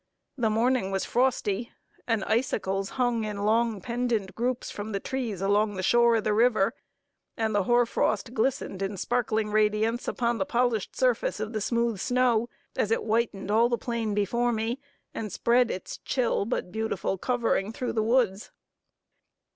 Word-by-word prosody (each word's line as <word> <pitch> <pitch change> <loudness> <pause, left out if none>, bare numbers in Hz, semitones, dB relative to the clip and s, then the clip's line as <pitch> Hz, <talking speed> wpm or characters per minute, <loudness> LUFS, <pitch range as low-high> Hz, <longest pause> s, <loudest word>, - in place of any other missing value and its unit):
The 235 -5 +1
morning 230 -1 +1
was 195 0 -1
frosty, 235 -3 0 0.4
and 225 -4 +1
icicles 195 -5 0
hung 245 -3 +1
in 205 -1 -3
long 225 0 +2
pendant 235 -4 -1
groups 245 +3 -2
from 210 +1 -6
the 200 - 0
trees 230 -6 -3
along 205 +1 +2
the 185 - -3
shore 235 +3 +4
of 220 - 0
the 215 - +1
river 225 -1 +3 0.6
and 220 -1 0
the 205 -2 +1
hoar 240 +2 +4
frost 220 0 -1
glistened 220 -5 -1
in 195 0 -2
sparkling 220 -1 0
radiance 215 +2 +1
upon 235 -2 0
the 190 - +1
polished 235 -4 0
surface 250 -5 +1
of 215 +2 -4
the 215 - -2
smooth 235 -1 0
snow, 245 -1 +2 0.3
as 210 - 0
it 225 - +1
whitened 220 -3 -1
all 230 +3 +4
the 240 - +1
plain 230 -4 -2
before 235 +4 +1
me, 230 +3 -2 0.3
and 215 -3 -4
spread 240 +4 +3
its 185 - -5
chill 240 -5 0
but 210 -5 -3
beautiful 220 -3 -2
covering 230 -4 0
through 245 +2 -3
the 220 - +1
woods. 225 -3 +1
225 Hz, 165 wpm, -27 LUFS, 210-240 Hz, 0.6 s, shore